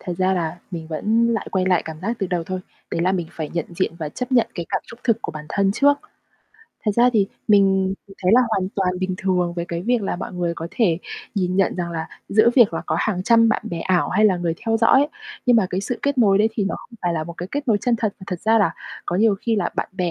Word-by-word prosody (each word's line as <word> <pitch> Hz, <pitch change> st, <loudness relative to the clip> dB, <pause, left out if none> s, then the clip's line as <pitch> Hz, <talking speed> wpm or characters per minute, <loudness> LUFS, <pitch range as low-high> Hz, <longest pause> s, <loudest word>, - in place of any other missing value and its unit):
Thật 180 Hz, -, -4 dB
ra 185 Hz, 0 st, +2 dB
là 170 Hz, -1 st, -2 dB
mình 165 Hz, -3 st, -6 dB
vẫn 215 Hz, +9 st, +1 dB
lại 215 Hz, -, -3 dB
quay 185 Hz, -1 st, +1 dB
lại 180 Hz, -2 st, +3 dB
cảm 160 Hz, -1 st, -8 dB
giác 230 Hz, +5 st, -2 dB
từ 195 Hz, -, -1 dB
đầu 175 Hz, -2 st, -2 dB
thôi. 185 Hz, +1 st, -4 dB, 0.3 s
Đấy -, -, -1 dB
là 185 Hz, +2 st, +2 dB
mình 175 Hz, -3 st, -1 dB
phải 155 Hz, -2 st, -5 dB
nhận 170 Hz, -, -1 dB
diện 185 Hz, -2 st, 0 dB
và 155 Hz, -3 st, -3 dB
chấp 250 Hz, -, -5 dB
nhận 240 Hz, -3 st, +4 dB
cái 170 Hz, -2 st, -4 dB
cảm -, -, -1 dB
xúc 235 Hz, +1 st, -12 dB
thực 230 Hz, -3 st, +2 dB
của -, -, -4 dB
bản 150 Hz, 0 st, -8 dB
thân 195 Hz, +3 st, +1 dB
trước. 285 Hz, +4 st, +3 dB, 0.9 s
Thật 210 Hz, -, +2 dB
ra 245 Hz, +1 st, +5 dB
thì 205 Hz, -4 st, +3 dB, 0.2 s
mình 195 Hz, -2 st, +4 dB
thì 195 Hz, -, -13 dB
thấy 185 Hz, -, +3 dB
là 250 Hz, -, +7 dB
hoàn 190 Hz, -4 st, 0 dB
toàn 190 Hz, -2 st, +1 dB
bình 185 Hz, 0 st, -1 dB
thường 180 Hz, -3 st, 0 dB
với 170 Hz, -, -2 dB
cái 170 Hz, 0 st, -3 dB
việc 240 Hz, +1 st, +1 dB
là 190 Hz, -, -2 dB
mọi -, -, -6 dB
người 175 Hz, -2 st, -2 dB
có 165 Hz, 0 st, -6 dB
thể 180 Hz, -9 st, +1 dB, 0.4 s
nhìn 185 Hz, -2 st, 0 dB
nhận 195 Hz, -2 st, +2 dB
rằng 175 Hz, -1 st, -3 dB
là 160 Hz, -1 st, -4 dB, 0.2 s
giữa 215 Hz, +3 st, +5 dB
việc 235 Hz, -3 st, +6 dB
là -, -, -3 dB
có -, -, 0 dB
hàng 185 Hz, -4 st, -1 dB
trăm 230 Hz, +1 st, +5 dB
bạn 215 Hz, -, +1 dB
bè 165 Hz, -1 st, -3 dB
ảo 185 Hz, -2 st, +1 dB
hay 215 Hz, +4 st, +2 dB
là 190 Hz, -4 st, +4 dB
người 170 Hz, -2 st, -1 dB
theo 225 Hz, -, +3 dB
dõi, 265 Hz, +6 st, +4 dB, 0.4 s
nhưng 245 Hz, -1 st, +6 dB
mà 200 Hz, -4 st, +3 dB
cái 185 Hz, -, -1 dB
sự 240 Hz, +4 st, -3 dB
kết 280 Hz, -1 st, 0 dB
nối 200 Hz, -4 st, +5 dB
đấy 215 Hz, -, +4 dB
thì 210 Hz, -3 st, -1 dB
nó 195 Hz, -, -1 dB
không 235 Hz, -, -15 dB
phải 175 Hz, -, +1 dB
là 160 Hz, -2 st, -2 dB
một 170 Hz, -, -7 dB
cái 180 Hz, -, -6 dB
kết 285 Hz, -1 st, -3 dB
nối 210 Hz, -3 st, +4 dB
chân 245 Hz, -2 st, +1 dB
thật, 215 Hz, -3 st, -1 dB
mà -, -, -9 dB
thật 180 Hz, -3 st, -4 dB
ra 225 Hz, +1 st, +3 dB
là 165 Hz, -6 st, +2 dB, 0.3 s
có 175 Hz, -, -1 dB
nhiều 215 Hz, 0 st, +4 dB
khi 230 Hz, -2 st, 0 dB
là -, -, +1 dB
bạn -, -, -2 dB
bè 180 Hz, -2 st, -1 dB
190 Hz, 285 wpm, -22 LUFS, 175-225 Hz, 0.9 s, là